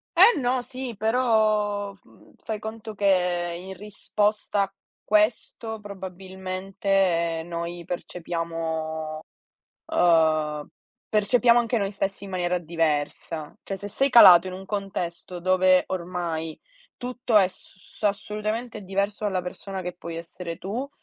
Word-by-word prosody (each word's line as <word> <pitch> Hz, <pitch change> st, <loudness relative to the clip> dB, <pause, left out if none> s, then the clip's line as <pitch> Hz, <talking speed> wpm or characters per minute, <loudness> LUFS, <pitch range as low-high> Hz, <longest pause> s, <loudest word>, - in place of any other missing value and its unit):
Eh, 475 Hz, -, +7 dB
no, 250 Hz, 0 st, +1 dB
sì, 250 Hz, -2 st, -6 dB
però, 215 Hz, -3 st, +2 dB
uhm, -, -, -21 dB
fai 215 Hz, -2 st, -3 dB
conto 220 Hz, 0 st, -7 dB
che 180 Hz, -3 st, +1 dB
in 190 Hz, +2 st, -8 dB
risposta 210 Hz, 0 st, 0 dB
a 195 Hz, 0 st, -6 dB, 0.3 s
questo 215 Hz, +1 st, +1 dB
probabilmente 190 Hz, -2 st, -1 dB
noi 170 Hz, 0 st, -5 dB
percepiamo 160 Hz, -3 st, -4 dB, 0.7 s
uhm, 155 Hz, -3 st, +2 dB, 0.4 s
percepiamo 235 Hz, +3 st, +4 dB
anche 235 Hz, 0 st, +1 dB
noi 200 Hz, -1 st, -1 dB
stessi 195 Hz, 0 st, -3 dB
in 195 Hz, -, -8 dB
maniera 180 Hz, -1 st, 0 dB
diversa. 155 Hz, -2 st, -2 dB
Cioè 195 Hz, -, -4 dB
se 205 Hz, +2 st, -6 dB
sei 275 Hz, +7 st, +2 dB
calato 185 Hz, -7 st, +9 dB
in 185 Hz, -, -4 dB
un 190 Hz, +1 st, -8 dB
contesto, 180 Hz, -3 st, -4 dB
dove 185 Hz, 0 st, +4 dB
ormai 170 Hz, -3 st, -3 dB, 0.4 s
tutto 245 Hz, -2 st, -1 dB
è 190 Hz, -3 st, +6 dB
s 190 Hz, 0 st, -17 dB
assolutamente 215 Hz, +2 st, -2 dB
diverso 200 Hz, +2 st, -2 dB
dalla 190 Hz, -3 st, 0 dB
persona 190 Hz, +1 st, -6 dB
che 180 Hz, 0 st, -5 dB
puoi 170 Hz, -2 st, -7 dB
essere 170 Hz, +1 st, -6 dB
tu, 230 Hz, +10 st, -4 dB
190 Hz, 125 wpm, -25 LUFS, 175-210 Hz, 0.7 s, calato